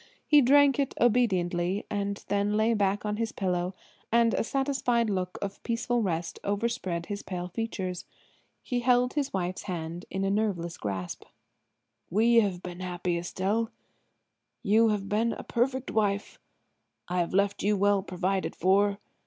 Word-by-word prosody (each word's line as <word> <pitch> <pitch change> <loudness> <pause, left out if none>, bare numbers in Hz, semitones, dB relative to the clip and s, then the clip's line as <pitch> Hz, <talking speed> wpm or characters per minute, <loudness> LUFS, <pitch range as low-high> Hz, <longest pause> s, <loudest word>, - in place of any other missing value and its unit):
He 295 -1 +6
drank 280 +2 +5
it 275 - 0
obediently 190 -5 +2
and 200 -1 -3
then 205 +1 +1
lay 220 +2 +3
back 205 -1 0
on 210 0 -1
his 230 0 -1
pillow 180 -1 -1 0.4
and 230 0 +4
a - - +1
satisfied 250 -3 0
look 185 -2 -2
of 200 0 -5
peaceful 235 +1 0
rest 170 -4 -2
overspread 200 -5 -1
his 205 +2 -5
pale 180 -1 -5
features. 185 -3 -4 0.6
He 245 - -1
held 250 0 +3
his 290 -2 -1
wife's 185 -1 -2
hand 175 -2 -5
in 195 - -2
a 195 - +1
nerveless 195 -5 -1
grasp. 95 -3 -4 0.9
"We 230 +5 +4
have 195 -5 +2
been 180 0 -7
happy, 180 -1 -2
Estelle. 195 +6 -1 0.9
You 220 +3 +4
have 205 -2 -1
been 220 +3 +1
a - - -7
perfect 260 +2 -1
wife. 205 -2 0 0.7
I 180 +1 -1
have 170 - 0
left 200 0 +2
you 205 +1 +2
well 200 0 +3
provided 185 0 -2
for. 200 +2 +3
200 Hz, 155 wpm, -28 LUFS, 180-230 Hz, 0.9 s, He